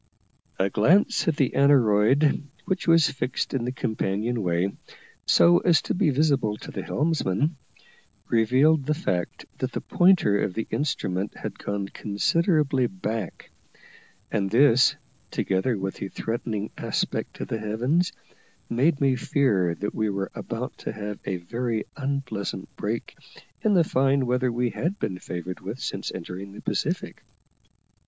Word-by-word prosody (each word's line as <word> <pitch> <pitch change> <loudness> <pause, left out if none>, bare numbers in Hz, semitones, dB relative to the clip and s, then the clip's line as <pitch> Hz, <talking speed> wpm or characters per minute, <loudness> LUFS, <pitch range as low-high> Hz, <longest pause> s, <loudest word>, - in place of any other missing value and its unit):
A 95 +1 +1
glance 185 - +3
at 160 - +2
the 135 -4 +1
aneroid, 135 0 +4 0.2
which 190 -2 -2
was 165 -2 +5
fixed 130 -1 -3
in 130 -3 -1
the 125 - -1
companion 110 -1 -1
way, 90 +1 0 0.5
so 85 0 +6
as 160 - +4
to - - -1
be 180 -3 +2
visible 135 -7 +2
to - - -9
the - - -4
helmsman, 150 - 0 0.7
revealed 130 +6 +3
the 155 - +2
fact 90 - -2
that - - -2
the - - -3
pointer 175 - +4
of 90 - -1
the 110 - -2
instrument 100 -9 -2
had 105 -2 -6
gone 100 -1 -3
considerably 135 - +1
back; 115 - -5 0.8
and 100 -3 0
this, 125 +2 +5 0.3
together 100 +5 0
with 95 0 -4
the 100 - -4
threatening 110 -2 -3
aspect - - -2
of - - -5
the 115 - -2
heavens, 125 +12 0 0.6
made 140 +6 +2
me 135 -2 +3
fear 105 - +1
that 105 +3 -4
we 110 -1 0
were 100 -1 -3
about 115 +2 -5
to - - -4
have 105 -1 -6
a 95 -2 -1
very 115 +5 -3
unpleasant 135 -9 -4
break 110 +3 -4 0.5
in 210 -2 +3
the 175 - +6
fine 135 -2 +2
weather 125 0 +1
we 120 0 0
had 185 +5 -2
been 90 - -3
favoured 90 +1 -6
with 100 +7 -6
since - - -4
entering 95 +2 -7
the - - -10
Pacific. - - -2
120 Hz, 145 wpm, -25 LUFS, 100-140 Hz, 0.8 s, so